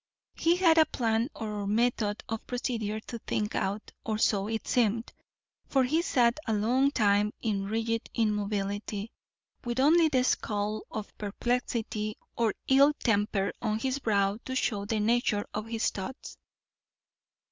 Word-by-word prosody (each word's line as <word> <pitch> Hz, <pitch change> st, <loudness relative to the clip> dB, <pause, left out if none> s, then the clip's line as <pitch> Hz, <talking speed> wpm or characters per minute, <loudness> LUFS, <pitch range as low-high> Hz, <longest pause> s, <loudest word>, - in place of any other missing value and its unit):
He 335 Hz, +1 st, +2 dB
had 335 Hz, -3 st, +5 dB
a 315 Hz, -, +6 dB
plan 230 Hz, +1 st, 0 dB
or 210 Hz, -2 st, -4 dB
method 215 Hz, -1 st, +1 dB
of 225 Hz, 0 st, -5 dB
procedure 230 Hz, -4 st, -2 dB
to 235 Hz, +1 st, -7 dB
think 210 Hz, -1 st, -2 dB
out, 200 Hz, +3 st, -2 dB
or 220 Hz, -2 st, -1 dB
so 205 Hz, -2 st, +2 dB
it 225 Hz, 0 st, -3 dB
seemed, 230 Hz, -1 st, +1 dB, 0.5 s
for 265 Hz, -1 st, +3 dB
he 310 Hz, +6 st, +2 dB
sat 245 Hz, -5 st, +2 dB
a 220 Hz, -, +1 dB
long 245 Hz, +6 st, +3 dB
time 210 Hz, -4 st, +2 dB
in 200 Hz, -3 st, -1 dB
rigid 225 Hz, +2 st, -2 dB
immobility, 205 Hz, -1 st, -1 dB, 0.5 s
with 240 Hz, 0 st, -2 dB
only 320 Hz, +4 st, +5 dB
the 260 Hz, -4 st, +2 dB
scowl 210 Hz, -3 st, -1 dB
of 215 Hz, -1 st, -6 dB
perplexity 215 Hz, 0 st, -2 dB, 0.2 s
or 230 Hz, -3 st, +1 dB
ill 280 Hz, +2 st, +6 dB
temper 205 Hz, -6 st, 0 dB
on 215 Hz, -2 st, 0 dB
his 260 Hz, +4 st, -1 dB
brow 200 Hz, -3 st, +1 dB
to 260 Hz, -, -4 dB
show 205 Hz, -5 st, 0 dB
the 215 Hz, +1 st, -1 dB
nature 215 Hz, -1 st, +1 dB
of 215 Hz, +1 st, -4 dB
his 225 Hz, 0 st, 0 dB
thoughts. 205 Hz, +8 st, -7 dB
220 Hz, 145 wpm, -29 LUFS, 210-245 Hz, 0.5 s, a